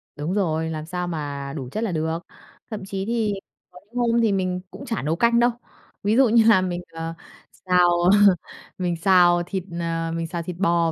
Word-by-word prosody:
Đúng 150 Hz, +4 st, -3 dB
rồi, 160 Hz, -5 st, 0 dB
làm 155 Hz, -1 st, -5 dB
sao 180 Hz, +1 st, -4 dB
mà 145 Hz, -4 st, -4 dB
đủ 130 Hz, -4 st, -5 dB
chất 215 Hz, -, -2 dB
là 220 Hz, -, -1 dB
được. 160 Hz, 0 st, -1 dB, 0.5 s
Thậm 210 Hz, -3 st, -5 dB
chí 195 Hz, 0 st, -4 dB
thì 225 Hz, -2 st, 0 dB, 0.4 s
có 180 Hz, -, -14 dB, 0.2 s
hôm 235 Hz, -1 st, +2 dB
thì 220 Hz, -3 st, +3 dB
mình 185 Hz, -2 st, -1 dB
cũng 275 Hz, -, -9 dB
chả 225 Hz, -4 st, -2 dB
nấu 155 Hz, +4 st, 0 dB
canh 235 Hz, +5 st, +3 dB
đâu. 240 Hz, +1 st, +5 dB, 0.5 s
Ví 210 Hz, +2 st, +2 dB
dụ 265 Hz, -2 st, +6 dB
như 230 Hz, 0 st, +5 dB
là 215 Hz, -5 st, +6 dB
mình, 180 Hz, -1 st, -2 dB
ờ, 165 Hz, 0 st, -5 dB, 0.5 s
xào, 180 Hz, -1 st, +4 dB
ờ, 195 Hz, +1 st, +6 dB, 0.4 s
mình 175 Hz, -2 st, -1 dB
xào 175 Hz, -1 st, +4 dB
thịt, 190 Hz, -1 st, -4 dB, 0.2 s
ờ, 165 Hz, -1 st, -2 dB
mình 165 Hz, 0 st, -3 dB
xào 170 Hz, 0 st, -4 dB
thịt 175 Hz, +1 st, -6 dB
bò 170 Hz, -3 st, +2 dB
180 Hz, 205 wpm, -23 LUFS, 165-205 Hz, 0.5 s, dụ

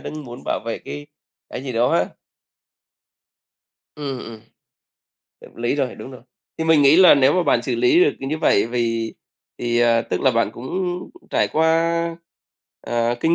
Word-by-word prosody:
đang 155 Hz, -1 st, -7 dB
muốn 120 Hz, +1 st, -10 dB
bảo -, -, -2 dB
vệ 115 Hz, -, -3 dB
cái 145 Hz, 0 st, -7 dB, 0.4 s
cái 130 Hz, -, -7 dB
gì 130 Hz, -, -4 dB
đó 120 Hz, +1 st, +2 dB
á. 90 Hz, +1 st, +2 dB, 1.9 s
Ừm, 140 Hz, -3 st, -5 dB
ừm. 115 Hz, -2 st, -9 dB, 1.0 s
Hợp -, -, -16 dB
lý 120 Hz, +3 st, -1 dB
rồi, 135 Hz, -3 st, -2 dB
đúng -, -, -10 dB
rồi. 130 Hz, -3 st, -12 dB, 0.4 s
Thì 160 Hz, -, -1 dB
mình 160 Hz, -2 st, +4 dB
nghĩ 140 Hz, +3 st, +6 dB
là 185 Hz, -1 st, +8 dB
nếu 140 Hz, 0 st, +4 dB
mà 180 Hz, -, +2 dB
bạn -, -, +2 dB
xử -, -, -2 dB
lý 365 Hz, -1 st, +4 dB
được, -, -, +3 dB
ừ, 135 Hz, -, -5 dB
như 155 Hz, +3 st, -2 dB
vậy 135 Hz, -9 st, +3 dB
vì 115 Hz, -1 st, -2 dB, 0.4 s
thì, 120 Hz, 0 st, 0 dB
à, 115 Hz, -1 st, +3 dB
tức -, -, -3 dB
là 130 Hz, -, +3 dB
bạn 115 Hz, -3 st, 0 dB
cũng 120 Hz, +3 st, -9 dB, 0.6 s
trải -, -, +1 dB
qua, 165 Hz, +1 st, +1 dB, 0.6 s
ờ, 120 Hz, 0 st, -1 dB
kinh 165 Hz, +4 st, +3 dB
130 Hz, 180 wpm, -21 LUFS, 120-160 Hz, 1.9 s, là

